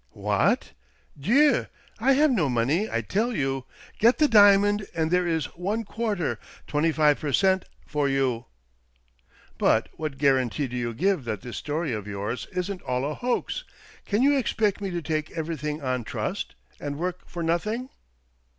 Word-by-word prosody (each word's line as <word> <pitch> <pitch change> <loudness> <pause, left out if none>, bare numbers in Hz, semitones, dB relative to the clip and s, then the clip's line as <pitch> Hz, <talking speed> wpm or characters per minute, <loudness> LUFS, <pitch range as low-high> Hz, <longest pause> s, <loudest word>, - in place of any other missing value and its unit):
" - - -38 0.2
What? - - +2 0.4
Dieu! 270 - +3 0.2
— - - -29
I 265 +5 +4
have 295 +2 +4
no 175 - +2
money, 135 - +1
I 115 - 0
tell 215 - -1
you! 135 -2 -1 0.3
Get 235 +3 +5
the 305 - +4
diamond, 205 -2 +5
and 160 0 0
there 180 0 +2
is 160 -4 0
one 205 +6 -2
quarter 215 -5 -2
— - - -22
twenty 155 +2 +1
five 150 -2 +3
per 150 -2 -2
cent. 190 +4 +3
— - - -30
for 145 -2 0
you! 130 -4 0 0.5
" - - -32
"But - - +3
what 155 -3 -3
guarantee 135 -1 +2
do 125 -1 -6
you 120 -2 -2
give 185 - +1
that 110 -4 -3
this 120 - -7
story 150 -2 -2
of 105 -2 -4
yours 105 +4 -4
isn't 185 +1 -3
all 125 +1 -1
a 150 - -2
hoax? 250 - -2 0.4
Can 210 +5 +2
you 285 +1 +5
expect 215 -6 0
me 195 - -2
to 175 -2 -3
take 155 0 -2
everything 155 -2 -3
on 130 -2 -1
trust, - - -4 0.2
and 145 -1 -4
work 180 +2 -4
for 170 - -4
nothing?" 215 +10 -1
160 Hz, 180 wpm, -26 LUFS, 135-205 Hz, 0.5 s, Get